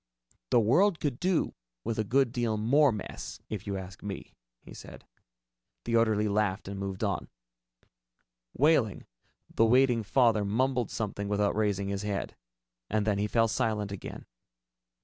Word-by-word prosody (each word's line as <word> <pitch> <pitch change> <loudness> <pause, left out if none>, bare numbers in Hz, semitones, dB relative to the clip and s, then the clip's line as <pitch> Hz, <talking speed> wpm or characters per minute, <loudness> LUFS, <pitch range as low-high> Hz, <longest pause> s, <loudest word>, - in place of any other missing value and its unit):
"The - - +5
world 165 - +3
could 140 -5 -2
do 180 -2 +1 0.3
with 115 - -2
a - - +2
good 130 +3 +2
deal 120 -3 -1
more 135 +6 +4
mess, 105 -3 -6
if 105 -1 -5
you 100 -1 -2
ask 95 0 -9
me," 100 -1 -7 0.3
he - - -12
said. - - -12 0.8
The 115 - 0
orderly 110 -2 +3
laughed 100 -2 0
and 100 0 -5
moved 95 -1 -4
on. - - -1 1.3
Wehling, 135 -8 +2 0.5
the - - +3
waiting 125 0 +4
father, 110 -1 +3
mumbled 125 +4 0
something 100 -2 -3
without 105 0 +1
raising 100 -2 0
his 100 0 -2
head. 105 -1 -3 0.5
And 105 -1 0
then 105 -2 +1
he 105 - +1
fell 115 +1 +3
silent 105 -2 -1
again. 100 - -7
110 Hz, 150 wpm, -29 LUFS, 100-120 Hz, 1.3 s, The